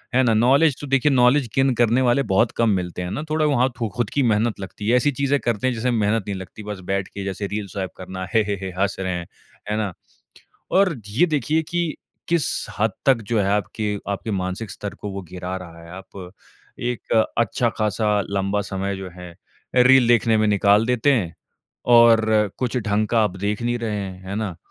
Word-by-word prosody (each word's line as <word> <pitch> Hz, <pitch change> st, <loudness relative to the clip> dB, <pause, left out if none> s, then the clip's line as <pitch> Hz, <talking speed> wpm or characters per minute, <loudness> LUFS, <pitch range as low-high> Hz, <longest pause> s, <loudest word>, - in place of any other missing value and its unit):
है 130 Hz, -, +5 dB
ना? 115 Hz, -2 st, +3 dB
नॉलेज 135 Hz, +6 st, +4 dB
तो 145 Hz, -, -6 dB
देखिए 135 Hz, +2 st, +2 dB
नॉलेज 125 Hz, +1 st, +4 dB
गेन 135 Hz, -1 st, +3 dB
करने 120 Hz, +2 st, +3 dB
वाले 130 Hz, +2 st, +3 dB
बहुत 110 Hz, +5 st, +3 dB
कम 115 Hz, -1 st, +3 dB
मिलते 90 Hz, -3 st, -2 dB
हैं 90 Hz, +1 st, -4 dB
ना, 150 Hz, -, -3 dB
थोड़ा 155 Hz, 0 st, +1 dB
वहाँ 130 Hz, -3 st, +2 dB
तो 115 Hz, -, -1 dB
ख़ुद 120 Hz, -4 st, 0 dB
की 140 Hz, -, 0 dB
मेहनत 110 Hz, -1 st, +1 dB
लगती 100 Hz, +2 st, -7 dB
है, 120 Hz, -, +4 dB
ऐसी 145 Hz, +4 st, +2 dB
चीज़ें 140 Hz, +2 st, 0 dB
करते 120 Hz, -1 st, -1 dB
हैं 130 Hz, -, +1 dB
जिसमें 120 Hz, +2 st, -1 dB
मेहनत 110 Hz, -2 st, +1 dB
नहीं 100 Hz, -, -2 dB
लगती 95 Hz, +3 st, -10 dB
बस 105 Hz, -1 st, -6 dB
बैठ 95 Hz, -1 st, -1 dB
के 100 Hz, -, -7 dB
जैसे 100 Hz, +1 st, -3 dB
रील 105 Hz, 0 st, -4 dB
स्वाइप 95 Hz, 0 st, -4 dB
करना 95 Hz, 0 st, -6 dB
हे, 115 Hz, -, +5 dB
हे, 105 Hz, 0 st, -2 dB
हे, 95 Hz, -, -4 dB
हँस 100 Hz, +1 st, +1 dB
रहे 95 Hz, -1 st, -2 dB
हैं। 85 Hz, -1 st, -5 dB, 0.4 s
है 105 Hz, -, 0 dB
ना? 105 Hz, -4 st, -2 dB, 0.8 s
और 185 Hz, -2 st, +3 dB
ये 125 Hz, +13 st, +3 dB
देखिए 155 Hz, 0 st, 0 dB
कि 170 Hz, -2 st, -1 dB, 0.3 s
किस 170 Hz, -3 st, +2 dB, 0.3 s
हद 110 Hz, +2 st, +2 dB, 0.2 s
तक 130 Hz, -4 st, +4 dB
जो 115 Hz, -, +1 dB
है 100 Hz, -, +1 dB
आपके 105 Hz, 0 st, -1 dB
आपके 100 Hz, +3 st, -3 dB
मानसिक 95 Hz, +2 st, -3 dB
स्तर 100 Hz, +1 st, -6 dB
को 105 Hz, -, -7 dB
वो 95 Hz, 0 st, -6 dB
गिरा 90 Hz, +1 st, -5 dB
रहा 85 Hz, -3 st, -10 dB
है। 85 Hz, -, -13 dB
आप 95 Hz, -1 st, -10 dB, 0.6 s
एक 125 Hz, -, -5 dB, 0.3 s
अच्छा 115 Hz, +1 st, +1 dB
खासा 105 Hz, 0 st, 0 dB, 0.2 s
लंबा 100 Hz, +1 st, 0 dB
समय 100 Hz, 0 st, -3 dB
जो 95 Hz, -1 st, -7 dB
है 90 Hz, 0 st, -10 dB
अ, -, -, -23 dB, 0.4 s
रील 125 Hz, -1 st, +6 dB
देखने 115 Hz, -1 st, +4 dB
में 110 Hz, 0 st, +2 dB
निकाल 105 Hz, +2 st, +4 dB
देते 125 Hz, +3 st, +2 dB
हैं 90 Hz, -10 st, -1 dB, 0.6 s
और 115 Hz, -1 st, +6 dB, 0.3 s
कुछ 125 Hz, 0 st, -2 dB
ढंग 105 Hz, -2 st, 0 dB
का 115 Hz, -1 st, +2 dB
आप 95 Hz, -2 st, -2 dB
देख 105 Hz, +3 st, -2 dB
नहीं 120 Hz, 0 st, 0 dB
रहे 115 Hz, -3 st, -3 dB
हैं। 95 Hz, -1 st, -7 dB
है 100 Hz, -, -4 dB
ना? 105 Hz, -6 st, -3 dB
110 Hz, 215 wpm, -22 LUFS, 100-125 Hz, 0.8 s, रील